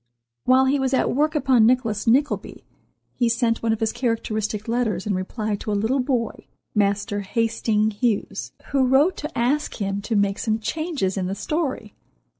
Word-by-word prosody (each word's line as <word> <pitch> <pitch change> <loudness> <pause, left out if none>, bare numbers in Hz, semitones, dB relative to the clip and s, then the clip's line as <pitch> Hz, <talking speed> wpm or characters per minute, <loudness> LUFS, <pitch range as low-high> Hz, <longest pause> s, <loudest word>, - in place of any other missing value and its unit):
While 260 +1 +5
he 275 +2 +2
was 265 0 +1
at - - +1
work 305 +4 +1
upon 260 -6 +4
"Nicholas 230 -4 +1
Nickleby," 275 +6 +1 0.5
he 240 -2 +1
sent 230 0 +1
one 230 - +1
of 220 - 0
his 220 - 0
characteristic 220 -3 -2
letters 225 -6 -1
in 210 - 0
reply 210 +3 -2
to 210 - -5
a 205 - +1
little 225 +7 +1
boy—Master 205 -5 -2
Hasting 220 +1 0
Hughes—who 235 +4 -1
wrote 285 +8 +4
to 300 - -6
ask 275 +6 0
him 200 -1 -2
to 220 +2 -2
make 200 -1 +1
some 220 -1 0
changes 275 - -2
in 185 -1 -1
the 195 - -3
story. 270 -7 -3
230 Hz, 165 wpm, -23 LUFS, 210-260 Hz, 0.5 s, While